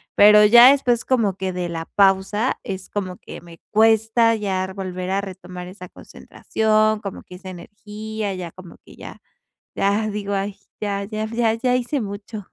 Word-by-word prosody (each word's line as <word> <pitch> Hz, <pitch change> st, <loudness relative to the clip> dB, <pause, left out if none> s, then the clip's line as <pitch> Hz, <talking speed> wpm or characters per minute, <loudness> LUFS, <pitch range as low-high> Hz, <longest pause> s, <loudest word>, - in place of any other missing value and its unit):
Pero 210 Hz, +1 st, +7 dB
ya 240 Hz, +5 st, +8 dB
después, 245 Hz, -4 st, +1 dB
como 225 Hz, -7 st, +1 dB
que 190 Hz, -1 st, -3 dB
de 180 Hz, -1 st, -3 dB
la 165 Hz, -1 st, -5 dB
pausa, 200 Hz, +4 st, +2 dB
es 190 Hz, -3 st, -6 dB
como 185 Hz, -3 st, -4 dB
que -, -, -11 dB
me 170 Hz, -1 st, -15 dB
cuesta 225 Hz, +1 st, +3 dB
ya 190 Hz, -3 st, -3 dB
volver 185 Hz, -1 st, -5 dB
a 195 Hz, +1 st, 0 dB
retomar 180 Hz, -2 st, -9 dB
esa 185 Hz, -1 st, -10 dB
concentración, 215 Hz, +2 st, -1 dB
como 200 Hz, -2 st, -8 dB
que 180 Hz, -, -13 dB
esa 185 Hz, +1 st, -10 dB
energía, 210 Hz, +2 st, -7 dB
ya 175 Hz, -3 st, -6 dB
como 185 Hz, -2 st, -14 dB
que -, -, -16 dB
ya -, -, -11 dB, 0.5 s
ya 205 Hz, +2 st, +1 dB
digo: 205 Hz, -1 st, -4 dB
"Ay 195 Hz, 0 st, -2 dB, 0.2 s
ya, 200 Hz, -1 st, -2 dB
ya, 215 Hz, +1 st, -4 dB
ya, 225 Hz, 0 st, 0 dB
ya 250 Hz, +2 st, 0 dB
hice 250 Hz, +3 st, -1 dB
mucho". 205 Hz, -1 st, -7 dB
205 Hz, 170 wpm, -21 LUFS, 190-220 Hz, 0.5 s, ya